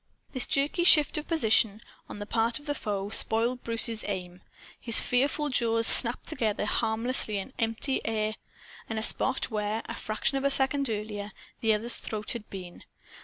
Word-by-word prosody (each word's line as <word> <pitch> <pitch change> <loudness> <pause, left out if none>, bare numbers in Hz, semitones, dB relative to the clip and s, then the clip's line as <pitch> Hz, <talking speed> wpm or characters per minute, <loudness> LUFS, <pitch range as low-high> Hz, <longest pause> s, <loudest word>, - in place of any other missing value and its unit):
This 255 - +2
jerky 285 +5 -1
shift 305 -2 +4
of 300 - -11
position, 220 - +1 0.3
on - - -9
the 205 - -7
part 230 +2 -1
of 295 - -14
the 290 - -3
foe, 205 -6 -5
spoiled 235 +3 +2
Bruce's 230 -1 0
aim. 180 -2 -6 0.4
His 230 -2 +4
fearful 285 +4 -1
jaws 230 -3 0
snapped 235 +1 +8
together 215 -2 -3
harmlessly 220 0 -1
in 200 +7 -8
empty 230 +4 -2
air 215 -1 -3 0.6
at 225 - -5
a 220 - -3
spot 265 +2 0
where, 210 +1 -3
a - - -7
fraction 220 +5 -3
of - - -8
a 280 - +1
second 275 0 +2
earlier, 210 -1 -6 0.3
the 220 -1 +1
other's 230 +3 0
throat 215 -1 -6
had 230 -3 -8
been. 180 -3 -11
225 Hz, 170 wpm, -26 LUFS, 210-260 Hz, 0.6 s, snapped